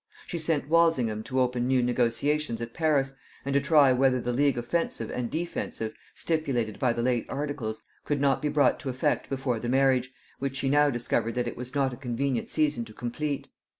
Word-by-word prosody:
She 170 Hz, -, -4 dB
sent 155 Hz, -3 st, 0 dB
Walsingham 150 Hz, -10 st, +3 dB
to 130 Hz, -, -1 dB
open 125 Hz, -1 st, +1 dB
new 130 Hz, -1 st, +3 dB
negotiations 125 Hz, +2 st, 0 dB
at 115 Hz, 0 st, -6 dB
Paris, 145 Hz, -4 st, +1 dB, 0.3 s
and 140 Hz, -, -1 dB
to 140 Hz, -, +4 dB
try 140 Hz, -2 st, +5 dB
whether 130 Hz, 0 st, +3 dB
the 125 Hz, 0 st, -2 dB
league 140 Hz, 0 st, +2 dB
offensive 120 Hz, -3 st, -2 dB
and 120 Hz, -2 st, -2 dB
defensive, 155 Hz, -9 st, -3 dB, 0.2 s
stipulated 135 Hz, -10 st, -1 dB
by 125 Hz, -, +3 dB
the 115 Hz, 0 st, -2 dB
late 120 Hz, -2 st, +1 dB
articles, 140 Hz, -7 st, -4 dB, 0.2 s
could 145 Hz, -1 st, -1 dB
not 140 Hz, -1 st, +2 dB
be 150 Hz, -, 0 dB
brought 145 Hz, -3 st, +3 dB
to 140 Hz, -, -5 dB
effect 130 Hz, 0 st, 0 dB
before 130 Hz, -3 st, -1 dB
the 120 Hz, -, -3 dB
marriage, 130 Hz, -1 st, +3 dB, 0.3 s
which 135 Hz, -1 st, -3 dB
she 135 Hz, 0 st, 0 dB
now 145 Hz, +1 st, +4 dB
discovered 120 Hz, -2 st, -1 dB
that 125 Hz, -1 st, 0 dB
it -, -, -4 dB
was 125 Hz, +3 st, -8 dB
not 135 Hz, -2 st, +1 dB
a -, -, -8 dB
convenient 125 Hz, 0 st, -2 dB
season 150 Hz, -6 st, +1 dB
to 110 Hz, -, -13 dB
complete. 135 Hz, +5 st, -3 dB
130 Hz, 195 wpm, -27 LUFS, 120-145 Hz, 0.3 s, try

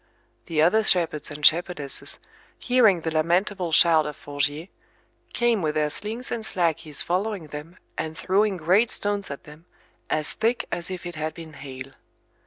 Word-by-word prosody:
The 160 Hz, -3 st, +2 dB
other 215 Hz, +7 st, +5 dB
shepherds 170 Hz, -7 st, +1 dB
and 150 Hz, 0 st, -4 dB
shepherdesses, 165 Hz, -4 st, +2 dB, 0.4 s
hearing 225 Hz, -8 st, +4 dB
the 160 Hz, -, -2 dB
lamentable 175 Hz, +3 st, +1 dB
shout 160 Hz, -1 st, +5 dB
of 150 Hz, -, -5 dB
Forgier, 145 Hz, +3 st, -2 dB, 0.6 s
came 240 Hz, -3 st, +2 dB
with 155 Hz, -2 st, -1 dB
their 150 Hz, -1 st, +1 dB
slings 225 Hz, -, -4 dB
and 230 Hz, -2 st, -2 dB
slackies 160 Hz, -7 st, -1 dB
following 185 Hz, -2 st, -2 dB
them, 150 Hz, +4 st, -8 dB, 0.2 s
and 160 Hz, 0 st, -4 dB
throwing 195 Hz, +1 st, +2 dB
great 185 Hz, +8 st, +3 dB
stones 205 Hz, -1 st, -2 dB
at 140 Hz, -, -7 dB
them, 155 Hz, 0 st, -14 dB, 0.4 s
as 155 Hz, -1 st, -1 dB
thick 230 Hz, +2 st, 0 dB
as 170 Hz, +1 st, -3 dB
if 185 Hz, -1 st, -6 dB
it 175 Hz, -, -5 dB
had 155 Hz, 0 st, -4 dB
been 160 Hz, -2 st, -10 dB
hail. 135 Hz, -2 st, -9 dB
170 Hz, 160 wpm, -25 LUFS, 155-200 Hz, 0.6 s, other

